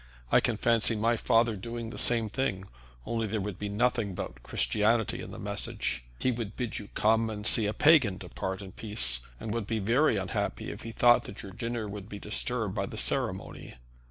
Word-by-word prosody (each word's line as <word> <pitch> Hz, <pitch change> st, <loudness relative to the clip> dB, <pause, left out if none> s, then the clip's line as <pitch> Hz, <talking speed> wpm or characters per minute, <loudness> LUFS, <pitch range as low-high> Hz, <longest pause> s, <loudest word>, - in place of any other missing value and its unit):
I -, -, +7 dB
can 120 Hz, -3 st, 0 dB
fancy 115 Hz, 0 st, +3 dB
my 115 Hz, +2 st, +2 dB
father 115 Hz, 0 st, +2 dB
doing 115 Hz, +3 st, -6 dB
the -, -, -8 dB
same 115 Hz, -2 st, +4 dB
thing, 105 Hz, -4 st, -2 dB, 0.4 s
only 115 Hz, -1 st, -1 dB
there 110 Hz, +1 st, -2 dB
would 100 Hz, -2 st, -5 dB
be 105 Hz, -, -3 dB
nothing 115 Hz, 0 st, +1 dB
about 60 Hz, -9 st, -6 dB
Christianity 110 Hz, -, +1 dB
in -, -, -7 dB
the -, -, -8 dB
message. -, -, -3 dB
He 130 Hz, -, +1 dB
would 115 Hz, -3 st, -5 dB
bid 120 Hz, -4 st, -3 dB
you 105 Hz, -, -9 dB
come 110 Hz, +1 st, +3 dB
and 105 Hz, -1 st, -6 dB
see 110 Hz, -1 st, +5 dB
a 105 Hz, -, -1 dB
pagan 135 Hz, -, +5 dB
depart 95 Hz, +1 st, -5 dB
in 95 Hz, -, -9 dB
peace, 65 Hz, -, +1 dB, 0.2 s
and 105 Hz, -, -4 dB
would 115 Hz, -3 st, -3 dB
be 115 Hz, -, -1 dB
very 115 Hz, +5 st, +3 dB
unhappy 95 Hz, -1 st, -2 dB
if -, -, -8 dB
he 115 Hz, -, -6 dB
thought 120 Hz, +1 st, +5 dB
that 100 Hz, -, -8 dB
your 100 Hz, -, -8 dB
dinner 115 Hz, +1 st, -4 dB
would 100 Hz, 0 st, -8 dB
be 100 Hz, -, -6 dB
disturbed 110 Hz, 0 st, -1 dB
by -, -, -2 dB
the -, -, -8 dB
ceremony. -, -, -1 dB
110 Hz, 205 wpm, -29 LUFS, 100-115 Hz, 0.4 s, I